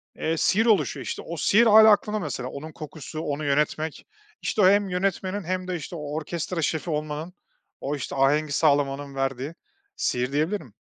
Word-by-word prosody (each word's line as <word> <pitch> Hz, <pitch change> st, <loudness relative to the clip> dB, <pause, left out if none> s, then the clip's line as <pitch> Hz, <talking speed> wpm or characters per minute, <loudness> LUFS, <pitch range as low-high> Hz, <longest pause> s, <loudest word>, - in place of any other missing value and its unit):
eee, 165 Hz, 0 st, -1 dB
sihir 220 Hz, +8 st, +3 dB
oluşuyor. 220 Hz, -4 st, +2 dB
İşte, -, -, -4 dB
o 170 Hz, 0 st, -7 dB
sihir 220 Hz, +9 st, +4 dB
hâlâ 220 Hz, 0 st, +8 dB
aklımda 210 Hz, +1 st, +2 dB
mesela, 130 Hz, -7 st, -4 dB
onun 155 Hz, +4 st, -8 dB
kokusu, 155 Hz, 0 st, -8 dB
onu 150 Hz, -1 st, -3 dB
yönetmek, 150 Hz, +2 st, 0 dB, 0.4 s
işte, 215 Hz, -, 0 dB
o 185 Hz, -, +7 dB
hem 200 Hz, 0 st, +3 dB
yönetmenin 190 Hz, +1 st, -1 dB
hem 185 Hz, +1 st, -3 dB
de 185 Hz, -, -2 dB
işte, 170 Hz, +1 st, -6 dB
o 150 Hz, -2 st, -6 dB
orkestra 165 Hz, +2 st, -3 dB
şefi 160 Hz, +3 st, -1 dB
olmanın, 155 Hz, +2 st, -3 dB, 0.5 s
o 145 Hz, +2 st, -2 dB
işte, 140 Hz, 0 st, -5 dB
ahengi 145 Hz, +3 st, +2 dB
sağlamanın 140 Hz, -1 st, +1 dB
verdiği 135 Hz, +3 st, -2 dB, 0.4 s
sihir 125 Hz, +2 st, -1 dB
diyebilirim. 155 Hz, -, -1 dB
155 Hz, 170 wpm, -25 LUFS, 145-185 Hz, 0.5 s, hâlâ